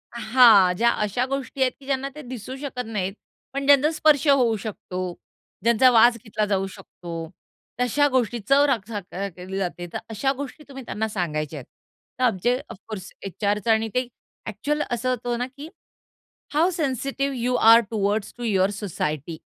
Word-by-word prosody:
हां, 220 Hz, -5 st, +6 dB
ज्या 235 Hz, +3 st, +4 dB
अशा 215 Hz, +3 st, 0 dB
गोष्टी 275 Hz, -1 st, -4 dB
आहेत 260 Hz, -1 st, +4 dB
की 275 Hz, -, -16 dB
ज्यांना 275 Hz, 0 st, -1 dB
ते 300 Hz, -, -8 dB
दिसू 250 Hz, 0 st, -7 dB
शकत 260 Hz, -3 st, -5 dB
नाहीत, 195 Hz, -4 st, -3 dB, 0.4 s
पण 275 Hz, 0 st, -2 dB
ज्यांचा 285 Hz, +2 st, +5 dB
स्पर्श 310 Hz, -2 st, +3 dB
होऊ 255 Hz, -5 st, +4 dB
शकतो, 190 Hz, -3 st, -6 dB, 0.6 s
ज्यांचा 235 Hz, +3 st, +5 dB
वास 235 Hz, 0 st, +6 dB
घेतला 215 Hz, -1 st, -1 dB
जाऊ 195 Hz, -1 st, 0 dB
शकतो. 165 Hz, -2 st, -8 dB, 0.5 s
तशा 270 Hz, +4 st, +3 dB
गोष्टींची 240 Hz, -3 st, 0 dB
चव 280 Hz, +1 st, +6 dB
रख 230 Hz, -7 st, 0 dB
चख 205 Hz, -4 st, -6 dB
अ, 195 Hz, +2 st, -2 dB
घेतली 185 Hz, +1 st, -7 dB
जाते, 175 Hz, -2 st, -3 dB
तर -, -, -1 dB
अशा 245 Hz, +5 st, 0 dB
गोष्टी 285 Hz, +2 st, -7 dB
तुम्ही 270 Hz, -1 st, -8 dB
त्यांना 220 Hz, 0 st, -2 dB
सांगायच्या 155 Hz, -7 st, -3 dB
आहेत. 125 Hz, -, -11 dB, 0.5 s
तर 255 Hz, -, 0 dB
आमचे 240 Hz, +1 st, +2 dB
ऑफ 230 Hz, -, -9 dB
कोर्स 190 Hz, -4 st, -7 dB
एचआरचं 205 Hz, +3 st, 0 dB
आणि 225 Hz, 0 st, +2 dB
ते 250 Hz, 0 st, +1 dB, 0.4 s
ॲक्चुअल 290 Hz, +8 st, -2 dB
असं 240 Hz, +1 st, -1 dB
होतं 245 Hz, -1 st, -1 dB
ना 245 Hz, -, 0 dB
की 280 Hz, +4 st, -10 dB, 0.9 s
how 320 Hz, +5 st, +3 dB
sensitive 275 Hz, -1 st, -1 dB
you 245 Hz, +1 st, 0 dB, 0.2 s
R 230 Hz, -, +9 dB
towards 205 Hz, -1 st, -1 dB
to 245 Hz, -, -7 dB
your 195 Hz, -4 st, +2 dB
society 160 Hz, -5 st, -3 dB
230 Hz, 170 wpm, -24 LUFS, 200-260 Hz, 0.9 s, R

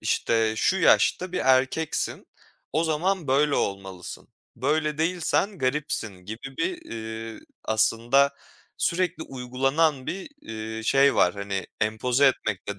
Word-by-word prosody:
işte, 110 Hz, -1 st, +1 dB
"Şu 185 Hz, +11 st, +2 dB
yaşta 185 Hz, -1 st, +3 dB
bir 180 Hz, -, -1 dB
erkeksin, 135 Hz, +4 st, +1 dB, 0.5 s
o 160 Hz, +4 st, +1 dB
zaman 165 Hz, +1 st, 0 dB
böyle 140 Hz, +2 st, +3 dB
olmalısın. 95 Hz, -2 st, -4 dB, 0.3 s
Böyle 150 Hz, +3 st, 0 dB
değilsen 180 Hz, +4 st, 0 dB
garipsin." 130 Hz, -6 st, -1 dB
gibi 120 Hz, +6 st, -8 dB
bir, 360 Hz, -1 st, -2 dB
eee, 110 Hz, 0 st, -6 dB, 0.2 s
aslında, 115 Hz, +6 st, +2 dB, 0.4 s
sürekli 175 Hz, -2 st, 0 dB
uygulanan 135 Hz, +2 st, 0 dB
bir, 190 Hz, +1 st, -4 dB
eee, 110 Hz, 0 st, -6 dB
şey 135 Hz, +4 st, +4 dB
var. 90 Hz, -, +3 dB
Hani, 100 Hz, -1 st, -4 dB
empoze 120 Hz, +5 st, +2 dB
etmek 110 Hz, -8 st, 0 dB
de 100 Hz, -1 st, -4 dB
135 Hz, 120 wpm, -25 LUFS, 110-160 Hz, 0.5 s, şey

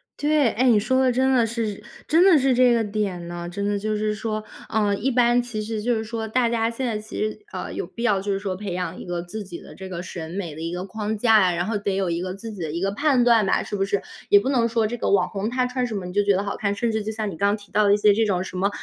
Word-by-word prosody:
对！ 295 Hz, -4 st, +2 dB
哎， 250 Hz, +4 st, +1 dB
你 220 Hz, -3 st, +5 dB
说 260 Hz, +5 st, +1 dB
的 255 Hz, -1 st, +3 dB
真 265 Hz, +2 st, +2 dB
的 240 Hz, -3 st, +4 dB
是， 220 Hz, -3 st, -3 dB, 0.2 s
真 330 Hz, +4 st, +5 dB
的 370 Hz, -5 st, +7 dB
是 265 Hz, -1 st, +3 dB
这 250 Hz, 0 st, +5 dB
个 230 Hz, -1 st, +2 dB
点 200 Hz, -5 st, -3 dB
呢！ 175 Hz, 0 st, -6 dB
真 200 Hz, +3 st, -4 dB
的 205 Hz, 0 st, 0 dB
就 215 Hz, +1 st, -1 dB
是 215 Hz, 0 st, 0 dB
说， 215 Hz, 0 st, -3 dB, 0.3 s
呃， 210 Hz, -2 st, +1 dB
一 230 Hz, +7 st, -1 dB
般 245 Hz, -1 st, +3 dB
其 240 Hz, -3 st, -6 dB
实 215 Hz, 0 st, -3 dB
就 240 Hz, +2 st, +1 dB
是 220 Hz, -, -2 dB
说， 220 Hz, 0 st, -4 dB
大 240 Hz, +2 st, +2 dB
家 230 Hz, -1 st, +1 dB
现 235 Hz, +3 st, -4 dB
在 220 Hz, -3 st, -1 dB
其 215 Hz, -, -9 dB
实， 215 Hz, 0 st, -2 dB
呃， -, -, -5 dB
有 -, -, -4 dB
必 235 Hz, -, -7 dB
要 205 Hz, -5 st, +2 dB
就 200 Hz, +1 st, -2 dB
是 195 Hz, -, 0 dB
说 195 Hz, -2 st, -3 dB
培 195 Hz, -2 st, -5 dB
养 180 Hz, 0 st, -3 dB
一 -, -, -8 dB
个 175 Hz, -1 st, -3 dB
自 205 Hz, +4 st, -6 dB
己 175 Hz, -3 st, -8 dB
的 -, -, -13 dB
这 190 Hz, -1 st, -9 dB
个 175 Hz, -1 st, -5 dB
审 165 Hz, -3 st, -7 dB
美 180 Hz, -4 st, -4 dB
的 160 Hz, -, -9 dB
一 165 Hz, -, -3 dB
个 180 Hz, +1 st, -4 dB
框 215 Hz, +2 st, -3 dB
架 220 Hz, -1 st, +5 dB
呀， 175 Hz, -, -2 dB
然 175 Hz, -, -1 dB
后 210 Hz, +1 st, -1 dB
得 200 Hz, -1 st, -1 dB
有 190 Hz, -3 st, 0 dB
一 170 Hz, -, -1 dB
个 185 Hz, 0 st, -4 dB
自 225 Hz, +3 st, -7 dB
己 200 Hz, -4 st, -8 dB
的 155 Hz, -, -3 dB
一 165 Hz, -, -3 dB
个 195 Hz, +2 st, 0 dB
判 265 Hz, +2 st, +2 dB
断 230 Hz, -3 st, +5 dB
吧， -, -, +2 dB
是 -, -, -5 dB
不 195 Hz, -, 0 dB
是？ 200 Hz, 0 st, -1 dB, 0.3 s
也 205 Hz, -, +7 dB
不 240 Hz, +7 st, -2 dB
能 235 Hz, -4 st, +2 dB
说 225 Hz, -1 st, +1 dB
这 225 Hz, +3 st, -2 dB
个 -, -, -1 dB
网 200 Hz, -, +3 dB
红 205 Hz, +2 st, -3 dB
他 255 Hz, +1 st, 0 dB
穿 250 Hz, 0 st, -1 dB
什 220 Hz, -, -5 dB
么 185 Hz, -, -5 dB
你 180 Hz, -, -7 dB
就 205 Hz, +1 st, +3 dB
觉 200 Hz, -1 st, +3 dB
得 200 Hz, -, -1 dB
好 200 Hz, -, -3 dB
看， 200 Hz, -1 st, 0 dB
甚 230 Hz, +3 st, 0 dB
至 220 Hz, -1 st, -1 dB
就 220 Hz, -, -3 dB
像 215 Hz, -1 st, -3 dB
你 -, -, -7 dB
刚 200 Hz, +4 st, +1 dB
提 205 Hz, -1 st, -18 dB
到 215 Hz, -, +3 dB
的 200 Hz, -, +5 dB
一 -, -, 0 dB
些 210 Hz, 0 st, +5 dB
这 225 Hz, +2 st, +2 dB
种， 185 Hz, -3 st, 0 dB
什 185 Hz, -, -9 dB
么， 195 Hz, +2 st, +1 dB
210 Hz, 345 characters per minute, -23 LUFS, 195-235 Hz, 0.3 s, 的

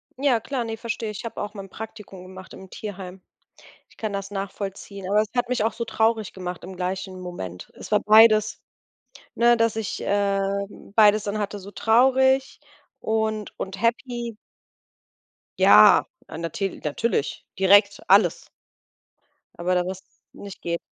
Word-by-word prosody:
Ja 265 Hz, -3 st, +2 dB
klar, 255 Hz, +2 st, -3 dB
ne, 225 Hz, -1 st, -5 dB
verstehe 230 Hz, -1 st, -4 dB
ich. 210 Hz, -, -8 dB
Ich -, -, -8 dB
habe 230 Hz, -, -5 dB
auch 205 Hz, +1 st, -5 dB
mal 200 Hz, -, -7 dB
'n -, -, -16 dB
Praktikum 210 Hz, -3 st, -10 dB
gemacht 185 Hz, 0 st, -12 dB
im 190 Hz, -, -12 dB
Tierheim. 190 Hz, -3 st, -8 dB, 0.7 s
Ich -, -, -24 dB
kann 215 Hz, -2 st, -4 dB
das 200 Hz, 0 st, -5 dB
nachvollziehen, 195 Hz, 0 st, -6 dB
aber 210 Hz, +1 st, +4 dB
es 215 Hz, -, -3 dB
hat 245 Hz, 0 st, 0 dB
mich 250 Hz, -4 st, 0 dB
auch 225 Hz, -, 0 dB
so 235 Hz, -, -4 dB
traurig 220 Hz, -2 st, 0 dB
gemacht 180 Hz, -1 st, -6 dB
im 185 Hz, +2 st, -9 dB
gleichen 185 Hz, +1 st, -4 dB
Moment. 95 Hz, -, -7 dB
Es -, -, -11 dB
war 210 Hz, -, +4 dB
beides 215 Hz, 0 st, +5 dB, 0.7 s
ne, 240 Hz, 0 st, +4 dB
dass 230 Hz, -1 st, +1 dB
ich, 220 Hz, -2 st, -4 dB
ähm, 200 Hz, 0 st, -1 dB
beides 215 Hz, -1 st, +5 dB
dann 205 Hz, +1 st, -2 dB
hatte, 205 Hz, 0 st, -4 dB
so 200 Hz, +1 st, -11 dB
traurig 265 Hz, +4 st, +3 dB, 0.4 s
und 220 Hz, -1 st, -2 dB
und 190 Hz, 0 st, -6 dB
happy. 235 Hz, 0 st, -1 dB, 1.2 s
Ja, -, -, +7 dB, 0.2 s
ah, -, -, -8 dB
natil 170 Hz, +4 st, -4 dB
natürlich, 150 Hz, +1 st, -2 dB
direkt 200 Hz, +2 st, +5 dB
alles 195 Hz, +3 st, +4 dB, 1.1 s
aber 180 Hz, +1 st, -1 dB
da 180 Hz, 0 st, +1 dB
wirst 190 Hz, +1 st, -6 dB, 0.3 s
nicht 200 Hz, -2 st, -11 dB
geh 170 Hz, 0 st, -2 dB
205 Hz, 160 wpm, -24 LUFS, 190-225 Hz, 1.2 s, Ja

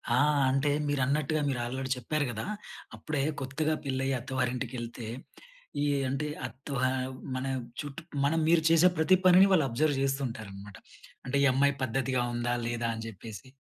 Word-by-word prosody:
ఆ! -, -, +3 dB, 0.3 s
అంటే, 135 Hz, +2 st, +2 dB, 0.2 s
మీరన్నట్టుగా 145 Hz, +2 st, +1 dB
మీరు 130 Hz, -3 st, -1 dB
ఆల్రెడీ 130 Hz, +2 st, -4 dB
చెప్పారు 145 Hz, +4 st, -1 dB
గదా! 110 Hz, -1 st, -4 dB, 0.5 s
అప్పుడే 150 Hz, -3 st, -2 dB, 0.2 s
కొత్తగా 150 Hz, +4 st, -1 dB
పెళ్లయ్యి 135 Hz, 0 st, 0 dB
అత్తవారింటికెళ్తే, 125 Hz, -2 st, -3 dB, 0.7 s
ఈ -, -, +2 dB, 0.3 s
అంటే, 140 Hz, +3 st, -1 dB, 0.2 s
అత్త 130 Hz, +3 st, -15 dB, 0.2 s
ఆహ్, 130 Hz, 0 st, -1 dB, 0.2 s
మన 130 Hz, +1 st, -2 dB, 0.4 s
చుట్టు 145 Hz, +1 st, -7 dB, 0.2 s
మనం 160 Hz, +3 st, +2 dB
మీరు 165 Hz, -1 st, +4 dB
చేసే 165 Hz, +2 st, +6 dB
ప్రతి 170 Hz, +4 st, +5 dB
పనిని 185 Hz, +2 st, +8 dB
వాళ్ళబ్జర్వ్ 145 Hz, -2 st, +2 dB
జేస్తుంటారనమాట. 110 Hz, -8 st, -3 dB, 0.5 s
అంటె, 130 Hz, +2 st, 0 dB
ఈ -, -, +6 dB
అమ్మాయి 140 Hz, +2 st, +3 dB
పద్ధతిగా 130 Hz, 0 st, 0 dB
ఉందా, 120 Hz, 0 st, -1 dB
లేదా 120 Hz, 0 st, -1 dB
అని 110 Hz, 0 st, -6 dB
జెప్పేసి. 110 Hz, +4 st, -9 dB
135 Hz, 140 wpm, -29 LUFS, 120-145 Hz, 0.7 s, పనిని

